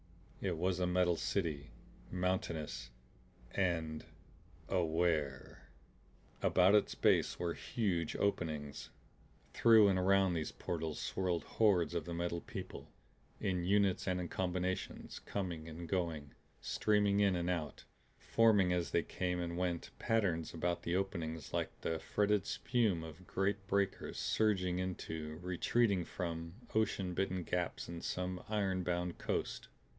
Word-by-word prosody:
It 90 -4 -1
was 90 +2 0
a 90 - +2
metal 90 -1 +3
city, 75 -8 -1 0.4
mountainous 85 -8 -2 0.6
and 80 -5 0 0.6
AWARE. 80 -8 0 0.7
About 95 +2 +5
its 105 - +3
base - - +3
were 85 -1 -1
huge 90 -8 -1
openings. 75 -10 -2 0.6
Through 110 -3 +7
and 95 -1 +2
around 95 0 +4
these 80 -2 -2
portals 80 -2 -3
swirled 90 -3 -1
hordes 90 -7 +3
of 85 -3 -2
the 85 -1 -4
Metal 85 0 -2
People; - - -7 0.5
in 90 -2 0
units 100 0 +2
and 90 -1 +1
in 90 - -3
combinations 90 0 -2
coming 85 -5 -4
and 85 +2 -7
going, 80 -5 -2 0.3
streaming 105 -1 +2
in 100 -2 +4
and 85 0 -1
out, 80 -5 -3 0.3
forming 105 -6 +4
as 85 -4 0
they - - +2
came 90 -1 -2
and 85 -1 -3
went 90 -1 -2
patterns 95 -8 +1
about 85 +1 -1
the 85 - -1
openings 85 -6 -3
like - - -2
the 80 -1 -1
fretted 105 +2 +1
spume 110 -9 +1
of 80 +3 -10
great 100 +1 -1
breakers 100 -1 0
surging 95 -5 +1
into, 80 -4 -4
retreating 95 +2 +2
from, 85 -1 -4 0.2
ocean 100 -4 +1
bitten 95 0 -1
gaps 90 +1 -2
in 85 0 -6
some 90 0 -3
iron 100 -3 +1
bound 90 -1 -2
coast. - - -2
90 Hz, 130 wpm, -35 LUFS, 85-95 Hz, 0.7 s, Through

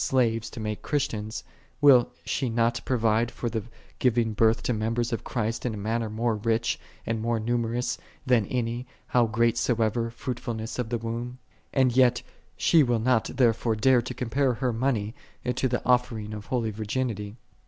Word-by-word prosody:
slaves 115 -3 +1
to - - -9
make 105 -1 -3
Christians, 110 -7 -2 0.4
will 140 -4 +6 0.2
she 130 -3 -1
not 115 +1 +1
provide 115 -2 +2
for 120 -1 -4
the 110 -1 -1 0.4
giving 120 -3 +2
birth 110 +1 +3
to 125 - +1
members 115 +2 -1
of 115 - -2
Christ 115 -1 -2
in 120 -3 -2
a - - -6
manner 110 +2 -1
more 110 +1 0
rich, 115 +2 0 0.3
and 115 -1 -1
more 115 0 0
numerous, 120 +2 -1 0.3
than 120 -5 +3
by - - -14
any, 120 0 -2 0.2
how 120 -2 +3
great 115 +1 +2
soever, 115 -1 +1
fruitfulness 115 -1 -5
of 120 -2 -2
the 120 - 0
womb? 115 +2 -4 0.3
And 130 -3 +2
yet 125 -2 +4 0.3
she 165 - +5
will 120 -4 +2
not 115 0 +2
therefore 115 -2 +2
dare 125 +3 +4
to 125 +2 -6
compare 125 +2 0
her 125 +1 -1
money 115 -3 0 0.3
to 125 +1 0
the 125 -1 0
offering1 115 -4 +1
of 105 -1 -7
holy 115 -4 0
virginity. 110 -1 -3
115 Hz, 175 wpm, -27 LUFS, 110-125 Hz, 0.4 s, will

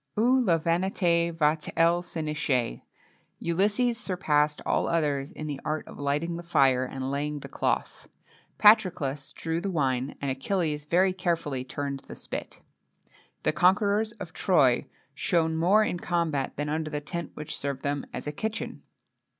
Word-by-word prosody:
Où 250 +4 +4
la 175 -7 +3
vanité 170 0 +1
va 155 -2 +2
t 155 - -8
elle 170 +1 +4
se 175 -1 -7
nicher? 135 - -1 0.6
Ulysses 205 +7 +1
surpassed 150 -8 +1
all - - +1
others 145 -4 0
in 155 - -7
the 145 -2 -4
art 155 0 -2
of - - -11
lighting 150 +4 -1
the - - -5
fire, 135 -7 +3
and 130 +1 -4
laying 145 +1 -2
the - - -7
cloth.[XXII - - -2 0.5
8] - - -42
Patroclus 180 -10 +4
drew 165 +1 -3
the 200 - -2
wine, 135 -6 0
and 140 -1 -1
Achilles 150 +1 -1
very 185 +4 +3
carefully 165 -8 -1
turned 140 +1 -4
the - - -8
spit.[XXII - - -6
9] - - -35 0.8
The - - +3
conquerors 205 +4 +3
of 190 -7 -9
Troy 140 -10 +3 0.3
shone 160 +3 +1
more 185 +7 +4
in 180 - -1
the - - -12
combat 165 -6 0
than 145 +1 -2
under 155 +1 -2
the 150 -1 -2
tent 170 +2 -6
which 150 - -5
served 140 -2 -3
them 145 0 -2
as - - -6
kitchen. 220 +5 -4
160 Hz, 165 wpm, -27 LUFS, 145-180 Hz, 0.8 s, Où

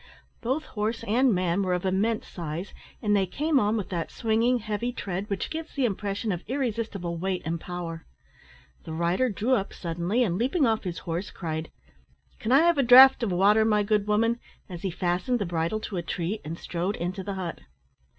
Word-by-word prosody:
Both 265 +6 -1
horse 220 +2 -3
and 245 +4 +3
man 180 -1 +1
were 185 -2 +1
of 180 - -3
immense 210 +4 0
size, 170 +2 -6 0.3
and 210 -1 +3
they 195 -2 +2
came 300 - +1
on 210 0 +1
with 200 -4 -4
that 170 -3 -3
swinging, 230 +2 +1
heavy 220 +1 -3
tread, 195 -3 -4
which 200 -2 -3
gives 320 0 -6
the 275 -3 +2
impression 205 0 -2
of 175 -2 -3
irresistible 225 -9 -2
weight 185 +1 -2
and 165 0 -2
power. 170 -2 -6 0.8
The 160 - -7
rider 170 +10 +1
drew 225 +5 0
up 200 -6 0
suddenly, 175 +7 -1
and, 185 -4 -1
leaping 270 +6 +2
off 220 -3 +1
his 175 -2 -3
horse, 170 +3 -3
cried, 160 -2 -4 0.7
"Can 235 -2 -2
I 270 +3 +7
have 340 -3 +3
a - - +6
draught 260 +1 +9
of 225 -5 0
water, 200 +5 +4
my 210 -1 +3
good 210 0 +1
woman?" 230 +3 +2 0.3
as 175 -3 -8
he 195 - -1
fastened 180 +7 0
the 205 - -2
bridle 170 +4 -1
to 200 - -5
a - - 0
tree, 175 +4 -3
and 160 +2 -5
strode 180 +5 -2
into 185 +2 -4
the 200 +1 -4
hut. 185 -3 -4
200 Hz, 200 wpm, -27 LUFS, 175-230 Hz, 0.8 s, draught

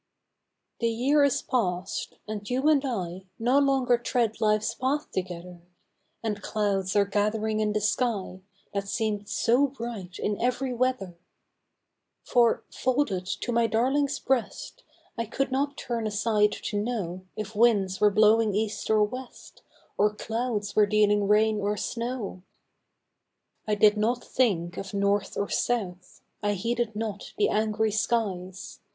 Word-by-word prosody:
THE 230 - +1
year 270 +6 +3
is 280 -2 +2
past, 185 -6 -2
and 210 -1 -5
you 260 +4 +1
and 295 -3 +4
I 190 -8 -4
No 250 +5 +3
longer 265 -3 +3
tread 235 -2 -1
life's 215 -1 +2
path 280 +4 -2
together, 180 -1 -5 0.6
And 210 -2 -2
clouds 200 -3 -1
are 200 -1 +5
gathering 215 +2 0
in 215 -1 +1
the 215 - 0
sky, 210 -4 -1 0.3
That 200 0 -2
seem'd 210 -1 -2
so 245 +6 +3
bright 230 -8 -7
in 205 -1 -2
ev'ry 250 +1 0
weather! 240 -8 -1 1.0
For, 235 -2 +3
folded 245 -9 0
to 240 - -3
my 235 -1 +3
darling's 265 +6 +1
breast, 265 - -2 0.4
I 230 - 0
could 275 +4 -2
not 280 +2 -1
turn 230 -2 -3
aside 210 0 +2
to 205 -1 -3
know 185 -6 -4
If 215 0 -6
winds 205 -4 +3
were 210 - +6
blowing 215 0 +4
east 210 0 -2
or 215 -1 +4
west, 255 +4 -7 0.4
Or 210 +1 +3
clouds 225 -2 -3
were 210 -1 +5
dealing 210 -1 +3
rain 215 +1 +3
or 205 +1 0
snow! 235 -6 -4 1.2
1 210 -2 0
did 210 0 +5
not 235 +3 0
think 180 -9 0
of 195 +1 -6
north 200 0 0
or 200 - 0
south, 185 -8 -2 0.2
I 205 -1 +1
heeded 230 +2 -2
not 215 -2 -5
the 210 - +3
angry 215 0 +1
skies. 205 -4 -2
215 Hz, 145 wpm, -27 LUFS, 200-240 Hz, 1.2 s, were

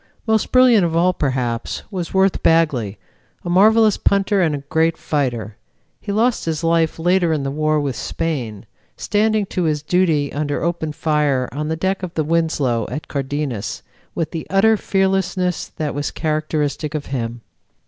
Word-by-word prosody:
Most 220 -1 +1
brilliant 250 -5 +6
of 165 -1 0
all, 180 +2 +3
perhaps, 125 -6 -2
was 180 -4 -4
Worth 190 0 +2
Bagley, 140 -11 +2 0.5
a 175 - -2
marvelous 215 +3 +5
punter 200 0 +2
and 145 -5 -1
great 160 +2 +1
fighter. 120 -8 -2 0.4
He - - -5
lost 230 +4 +1
his 160 0 -2
life 165 -1 +2
later 175 +1 +2
in 150 -3 0
the 135 - -2
war 155 +1 +1
with 140 -3 -2
Spain, 125 -11 -4 0.3
standing 215 0 +1
to 180 -2 -2
his 150 -2 0
duty 160 -4 +1
under 145 0 -2
open 170 -2 -1
fire 150 -4 0
on 150 +3 -3
the 160 - -1
deck 190 +4 -1
of 180 -2 -6
the 155 - +1
Winslow 150 -8 0
at 150 - -5
Cardenas, 140 -5 -3 0.3
with 165 -2 -2
the 165 - -5
utter 205 +4 +4
fearlessness 190 -3 0
that 150 -2 -4
was 145 0 -2
characteristic 155 -1 -2
of 150 - -3
him. 120 -2 -3
160 Hz, 160 wpm, -20 LUFS, 145-185 Hz, 0.5 s, brilliant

